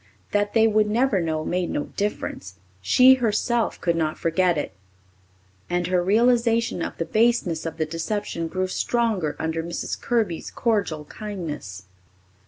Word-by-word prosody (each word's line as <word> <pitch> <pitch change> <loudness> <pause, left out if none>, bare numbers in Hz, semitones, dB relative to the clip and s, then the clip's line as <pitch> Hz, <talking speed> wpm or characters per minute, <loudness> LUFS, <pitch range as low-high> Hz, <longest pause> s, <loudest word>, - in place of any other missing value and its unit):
That 205 +1 0
they 225 -1 +6
would 215 -1 +2
never 230 -3 +2
know 160 -1 -2
made 180 0 -1
no 145 - -1
difference. 95 - -3 0.3
She 255 - +6
herself 235 -1 0
could 170 -1 0
not 155 -2 -1
forget 170 +1 +1
it, 145 - -3 1.0
and 175 0 0
her 180 0 +1
realization 230 0 +2
of - - -4
the 165 - -2
baseness 215 -5 +1
of 160 - -6
the 160 - 0
deception 165 +2 -3
grew 185 +3 -1
stronger 195 -5 0
under 160 0 -2
Mrs. 170 +1 -4
Kirby's 220 -9 -1
cordial 200 -10 -1
kindness. 150 - -6
185 Hz, 145 wpm, -24 LUFS, 165-225 Hz, 1.0 s, they